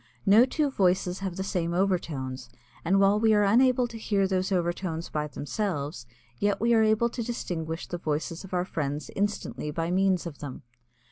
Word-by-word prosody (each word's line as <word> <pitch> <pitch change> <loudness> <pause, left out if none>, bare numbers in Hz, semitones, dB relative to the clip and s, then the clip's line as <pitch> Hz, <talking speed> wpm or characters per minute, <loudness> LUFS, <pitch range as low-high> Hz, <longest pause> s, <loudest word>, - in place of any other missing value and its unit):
No 215 +5 +7
two 290 +2 0
voices 185 -4 +1
have 190 -3 -4
the 190 - -3
same 170 -3 -1
overtones, 150 -9 -1 0.3
and 190 +4 +3
while 200 +1 +4
we 220 -1 +4
are 210 - +4
unable 250 +4 +4
to 230 -1 -9
hear 200 -3 +1
these 185 0 -1
overtones 175 -2 -1
by 150 -1 -2
themselves, 145 - -3 0.3
yet 205 -1 +1
we 235 +2 +3
are 225 - +5
able 220 +2 +3
to 240 - -4
distinguish 170 -8 -4
the 175 - -5
voices 160 +2 -3
of 190 - -11
our 180 -1 0
friends 150 -4 -3
instantly 205 -6 -2
by 165 +3 -2
means 185 -1 +2
of 160 -4 -7
them. 140 -3 -7
185 Hz, 185 wpm, -27 LUFS, 165-210 Hz, 0.3 s, No